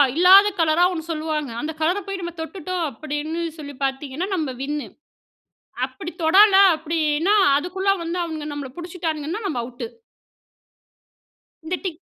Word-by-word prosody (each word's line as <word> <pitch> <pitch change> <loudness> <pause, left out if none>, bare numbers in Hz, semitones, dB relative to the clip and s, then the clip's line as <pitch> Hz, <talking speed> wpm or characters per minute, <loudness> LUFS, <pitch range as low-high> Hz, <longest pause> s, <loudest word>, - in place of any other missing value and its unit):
இல்லாத 380 +4 +8
கலரா 325 +1 +3
ஒண்ணு 330 -1 -6
சொல்லுவாங்க. 310 -4 -2
அந்த 310 +2 -3
கலர 340 +5 +2
போய் 390 -1 -4
நம்ம 345 -1 -5
தொட்டுட்டோம் 355 +1 -4
அப்பிடின்னு 310 +3 -4 0.2
சொல்லி 285 -1 -8
பாத்தீங்கன்னா, 270 +5 -2
நம்ம 310 -6 -2
வின் 290 +2 -2 1.1
அப்பிடி 260 +6 -8
தொடல 385 +5 +6 0.2
அப்பிடின்னா 315 +3 0 0.2
அதுக்குள்ள 365 +6 -1
வந்து 335 +2 -3
அவுங்க 320 -3 -5
நம்மள 285 -2 -5
பிடிச்சிட்டான்னுங்கன்னா, 335 0 -4
நம்ம 295 -10 -2
அவுட்டு. 245 - -6 1.8
இந்த 350 +3 -1
டிக் 350 -4 -4
320 Hz, 130 wpm, -22 LUFS, 300-360 Hz, 1.8 s, இல்லாத